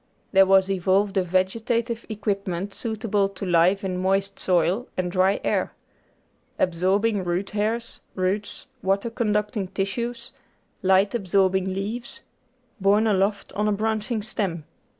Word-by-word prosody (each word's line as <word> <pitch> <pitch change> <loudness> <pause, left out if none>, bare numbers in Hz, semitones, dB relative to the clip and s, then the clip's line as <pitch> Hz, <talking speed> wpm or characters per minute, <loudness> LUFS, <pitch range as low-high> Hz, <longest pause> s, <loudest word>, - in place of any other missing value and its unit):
There 195 -1 +6
was 190 0 +5
evolved 195 +2 +1
a - - +4
vegetative 225 +6 -1
equipment 200 -3 -3
suitable 215 -3 -1
to 195 - -7
life 180 +3 +3
in 185 -1 -2
moist 195 +1 0
soil 185 +6 +1
and 180 -1 -1
dry 190 +2 +2
air; - - 0 0.8
absorbing 190 +4 +1
root 180 +3 -2
hairs, 225 +3 -2
roots, 190 +2 -2 0.2
water 200 +4 0
conducting 210 -3 -1
tissues; 235 +6 -3 0.5
light 190 +1 +3
absorbing 190 -3 +1
leaves, 210 +6 -5 0.6
borne 205 +3 +3
aloft 200 -1 0
on 210 +2 0
a - - +2
branching 215 +1 -1
stem. 190 -7 -3
195 Hz, 125 wpm, -24 LUFS, 190-215 Hz, 0.8 s, There